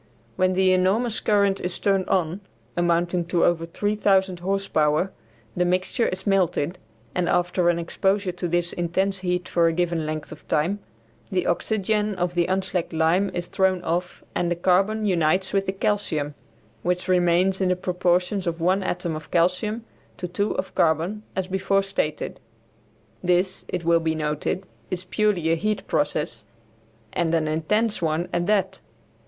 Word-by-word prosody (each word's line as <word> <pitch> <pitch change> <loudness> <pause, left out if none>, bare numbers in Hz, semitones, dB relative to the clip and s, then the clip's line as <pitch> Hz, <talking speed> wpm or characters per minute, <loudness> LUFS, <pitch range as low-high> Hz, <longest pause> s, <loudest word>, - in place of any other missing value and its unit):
When 185 0 +2
the 185 0 +4
enormous 210 +5 +2
current 200 -2 +2
is 180 0 -2
turned 195 -2 +1
on 180 +1 0 0.3
(amounting 175 0 +1
to 170 0 +2
over 165 -1 +1
3000 195 -1 +1
horse 195 +2 -1
power) 155 +5 +2 0.4
the 180 - +2
mixture 185 +6 +1
is 185 +1 -4
melted, 180 -4 +1 0.3
and 180 -1 0
after 175 0 +2
an 170 - +2
exposure 190 +3 0
to 180 0 -4
this 175 0 0
intense 190 +3 0
heat 180 -1 -1
for 170 -1 +3
a 165 - +1
given 170 -2 0
length 155 -1 -4
of 155 - -12
time 175 +7 +1 0.5
the 180 -1 0
oxygen 210 +3 0
of 175 -1 -1
the 175 -1 +1
unslacked 185 -2 -1
lime 165 +5 +2
is 175 -1 -2
thrown 185 -1 +1
off 175 +2 -2
and 175 - 0
the 175 - +1
carbon 195 +5 +2
unites 185 0 +1
with 195 -1 +1
the - - +1
calcium, 190 -7 -1 0.5
which 180 0 -1
remains 180 +1 +3
in 185 - +2
the 180 - +3
proportions 180 +1 0
of 165 0 -2
one 185 +4 +2
atom 175 -3 -2
of 155 -1 -8
calcium 185 +6 +1 0.3
to 180 - -4
two 200 +4 -1
of 190 - -3
carbon, 165 +6 +1
as 190 - -1
before 190 +1 +1
stated. 190 -6 -2 0.8
This, 180 +1 +1
it 175 -2 -4
will 170 0 +4
be 160 -1 -1
noted, 150 +4 -2 0.2
is 185 0 -3
purely 185 -4 +1
a - - +4
heat 210 +5 -1
process, 150 0 -1 0.7
and 170 -1 +1
an 155 -1 +1
intense 210 +9 0
one 165 +1 0
at 175 +1 0
that. 195 -2 +1
180 Hz, 165 wpm, -24 LUFS, 170-195 Hz, 0.8 s, the